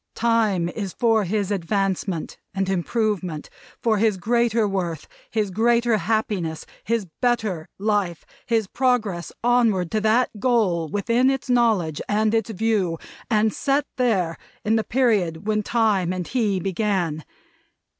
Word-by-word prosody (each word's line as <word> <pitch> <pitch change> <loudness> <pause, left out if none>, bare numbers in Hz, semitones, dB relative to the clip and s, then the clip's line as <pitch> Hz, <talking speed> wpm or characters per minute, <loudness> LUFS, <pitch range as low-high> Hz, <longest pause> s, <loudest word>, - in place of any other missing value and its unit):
Time 220 -7 +2
is 195 0 -5
for 225 -3 +2
his 205 +1 -1
advancement 195 -2 -2 0.2
and 195 0 0
improvement; 190 -4 -1 0.3
for 220 -3 +1
his 215 -2 +2
greater 230 +2 +1
worth, 175 -6 -3 0.2
his 210 -3 -1
greater 235 +2 +2
happiness, 205 -7 -1 0.2
his 230 -2 0 0.2
better 215 -9 0
life; 200 -5 -1 0.2
his 225 -2 +2
progress 220 -7 0
onward 230 -8 +2
to 215 - 0
that 220 +4 +3
goal 200 -9 +1
within 235 - +2
its 270 -1 -1
knowledge 215 -11 +2
and 215 +1 +2
its 225 -1 +1
view, 210 -5 0 0.3
and 215 -1 +2
set 280 +1 +1
there, 195 -10 +1 0.3
in 220 +2 +3
the 220 - +1
period 205 -9 +1
when 215 0 +1
Time 210 -5 +1
and 185 -2 -4
he 215 -7 +1
began. 185 -4 -1
210 Hz, 135 wpm, -23 LUFS, 185-230 Hz, 0.3 s, that